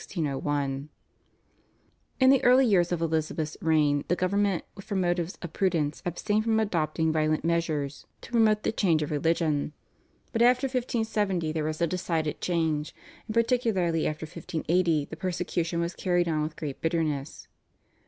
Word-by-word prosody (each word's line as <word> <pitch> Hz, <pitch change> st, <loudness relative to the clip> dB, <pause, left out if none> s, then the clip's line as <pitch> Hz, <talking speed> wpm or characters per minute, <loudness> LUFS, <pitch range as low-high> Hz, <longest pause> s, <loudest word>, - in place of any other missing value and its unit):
In 145 Hz, -3 st, -2 dB, 1.4 s
the 270 Hz, -, +3 dB
early 255 Hz, +2 st, +6 dB
years 180 Hz, -6 st, +3 dB
of 170 Hz, -1 st, 0 dB
Elizabeth's 155 Hz, -1 st, -1 dB
reign 150 Hz, -3 st, +2 dB
the 175 Hz, -, +2 dB
government 195 Hz, 0 st, +1 dB, 0.2 s
from 195 Hz, 0 st, -3 dB
motives 175 Hz, -1 st, -1 dB
of 175 Hz, -, -6 dB
prudence 165 Hz, -7 st, 0 dB
abstained 210 Hz, +5 st, 0 dB
from 220 Hz, -1 st, +2 dB
adopting 160 Hz, -6 st, 0 dB
violent 155 Hz, 0 st, +1 dB
measures 155 Hz, -4 st, -1 dB
to -, -, -12 dB
promote 220 Hz, -3 st, +3 dB
the -, -, +1 dB
change 170 Hz, -8 st, +2 dB
of 150 Hz, -, -5 dB
religion. 155 Hz, -1 st, 0 dB, 0.6 s
But 230 Hz, -, 0 dB
after 250 Hz, +3 st, +5 dB
1570 220 Hz, -, -1 dB
there 155 Hz, -1 st, -2 dB
was 155 Hz, +1 st, -3 dB
a -, -, +5 dB
decided 165 Hz, -3 st, -2 dB
change, 160 Hz, -4 st, -1 dB, 0.3 s
and 215 Hz, -, -5 dB
particularly 225 Hz, -9 st, +1 dB
after 155 Hz, +1 st, -4 dB
1580 165 Hz, 0 st, 0 dB
the 160 Hz, -, -8 dB
persecution 170 Hz, -1 st, -2 dB
was 170 Hz, +1 st, -1 dB
carried 175 Hz, -2 st, +1 dB
on 155 Hz, -2 st, 0 dB
with 155 Hz, +1 st, -3 dB
great 145 Hz, -4 st, -6 dB
bitterness. 155 Hz, -4 st, -2 dB
170 Hz, 145 wpm, -27 LUFS, 155-195 Hz, 1.4 s, early